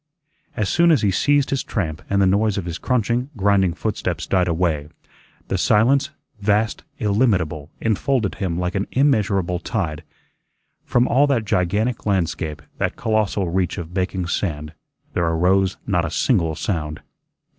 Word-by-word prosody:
As 105 Hz, -, 0 dB
soon 170 Hz, -, +3 dB
as 150 Hz, -9 st, +4 dB
he 100 Hz, -, +3 dB
ceased 145 Hz, +8 st, +2 dB
his 135 Hz, -2 st, +1 dB
tramp 80 Hz, -7 st, -3 dB
and 100 Hz, -, +2 dB
the 100 Hz, -, +4 dB
noise 100 Hz, +2 st, +2 dB
of 95 Hz, -, -3 dB
his 85 Hz, 0 st, -5 dB
crunching, 125 Hz, +1 st, 0 dB
grinding 95 Hz, -3 st, +2 dB
footsteps -, -, -2 dB
died 90 Hz, -2 st, +1 dB
away, 80 Hz, -3 st, 0 dB, 0.6 s
the 95 Hz, -, -1 dB
silence, 130 Hz, +9 st, +3 dB, 0.3 s
vast, 105 Hz, +2 st, +1 dB
illimitable, 100 Hz, -, +1 dB
enfolded 115 Hz, 0 st, 0 dB
him 85 Hz, -3 st, -1 dB
like 90 Hz, +1 st, -1 dB
an 100 Hz, 0 st, -1 dB
immeasurable 100 Hz, -10 st, +2 dB
tide. 85 Hz, -6 st, -3 dB, 0.8 s
From 120 Hz, +1 st, +2 dB
all 140 Hz, +4 st, +4 dB
that 125 Hz, -6 st, +1 dB
gigantic 105 Hz, +6 st, 0 dB
landscape, 80 Hz, -6 st, -1 dB, 0.2 s
that -, -, -1 dB
colossal 105 Hz, -4 st, 0 dB
reach 90 Hz, -1 st, 0 dB
of 85 Hz, 0 st, -6 dB
baking 95 Hz, 0 st, -1 dB
sand, 75 Hz, -4 st, -3 dB, 0.4 s
there 85 Hz, -, +1 dB
arose 95 Hz, +4 st, +2 dB
not 90 Hz, -5 st, +1 dB
a 85 Hz, -, -2 dB
single 85 Hz, -, +1 dB
sound. 75 Hz, -4 st, -3 dB
95 Hz, 150 wpm, -21 LUFS, 85-110 Hz, 0.8 s, as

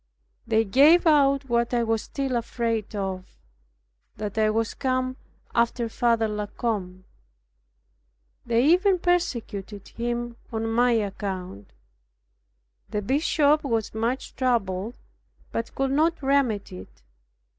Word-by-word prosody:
They 225 Hz, 0 st, +2 dB
gave 295 Hz, -, +5 dB
out 275 Hz, -3 st, +4 dB
what 235 Hz, 0 st, +1 dB
I 235 Hz, -, +2 dB
was 225 Hz, -1 st, 0 dB
still 270 Hz, -3 st, -3 dB
afraid 230 Hz, -2 st, -2 dB
of, 190 Hz, -2 st, -5 dB, 0.8 s
that 210 Hz, -1 st, -5 dB
I 215 Hz, -1 st, +3 dB
was 225 Hz, 0 st, 0 dB
come 255 Hz, 0 st, -1 dB, 0.4 s
after 235 Hz, 0 st, +1 dB
Father 230 Hz, -1 st, +1 dB
La 210 Hz, -1 st, -3 dB
Combe. 190 Hz, -5 st, -3 dB, 1.4 s
They 235 Hz, +2 st, +2 dB
even 365 Hz, +4 st, +4 dB
persecuted 230 Hz, -, -2 dB
him 240 Hz, 0 st, -4 dB
on 225 Hz, 0 st, -2 dB
my 240 Hz, +1 st, +3 dB
account. 190 Hz, -, -4 dB, 1.2 s
The 210 Hz, 0 st, -2 dB
bishop 295 Hz, +4 st, +2 dB
was 230 Hz, -6 st, -1 dB
much 230 Hz, +4 st, -2 dB
troubled, 225 Hz, -4 st, -1 dB, 0.5 s
but 230 Hz, 0 st, -4 dB
could 270 Hz, 0 st, 0 dB
not 315 Hz, +2 st, +1 dB
remedy 255 Hz, -, 0 dB
it. 65 Hz, -8 st, -15 dB
235 Hz, 115 wpm, -25 LUFS, 210-270 Hz, 1.4 s, gave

